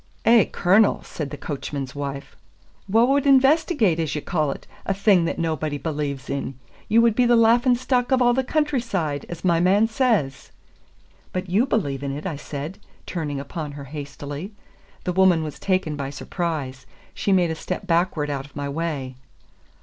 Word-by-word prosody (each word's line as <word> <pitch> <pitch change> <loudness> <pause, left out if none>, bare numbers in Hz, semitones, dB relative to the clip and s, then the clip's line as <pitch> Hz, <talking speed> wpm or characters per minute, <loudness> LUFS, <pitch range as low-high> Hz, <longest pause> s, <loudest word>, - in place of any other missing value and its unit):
"Eh, 230 -3 +6
Cornel," 200 +4 +3
said 150 -3 -5
the 145 - -7
coachman's 140 -2 -5
wife, 140 0 -6 0.5
"wha 225 +4 +5
would 275 +2 +2
investigate, 270 - +4
as 160 -3 -1
ye - - -1
call 155 -4 0
it, - - -6 0.2
a 195 - -1
thing 195 -3 +4
that - - -2
nobody 155 -3 -1
believes 145 -2 -3
in? 135 -2 -4 0.3
Ye 220 - +3
would 230 -1 +5
be 245 +2 +3
the 240 - +5
laughin' 235 +2 +5
stock 250 0 0
of 260 - +4
a' 245 -1 +4
the 265 +2 +1
country 295 -1 0
side, 160 - -3
as 170 +1 -7
my 170 -2 +3
man 195 +5 +4
says." 220 - 0 0.8
"But 185 -1 -4
you 220 +8 +3
believe 140 - -1
in 140 -1 -3
it," 150 - -8
I 175 -5 -2
said, 145 +4 -6 0.3
turning 150 -5 -3
upon 145 +1 -6
her 140 0 -8
hastily. 145 +5 -6 0.5
The 180 - -1
woman 185 -3 +4
was 150 -3 -6
taken 185 -5 0
by 140 -2 -4
surprise. 140 -3 -4 0.3
She 200 - -1
made 180 -3 +3
a - - -2
step 185 +4 -5
backward 165 -4 +1
out 135 -1 -3
of 145 - -24
my 145 -1 -3
way. 140 -4 -3
170 Hz, 180 wpm, -23 LUFS, 145-220 Hz, 0.8 s, Eh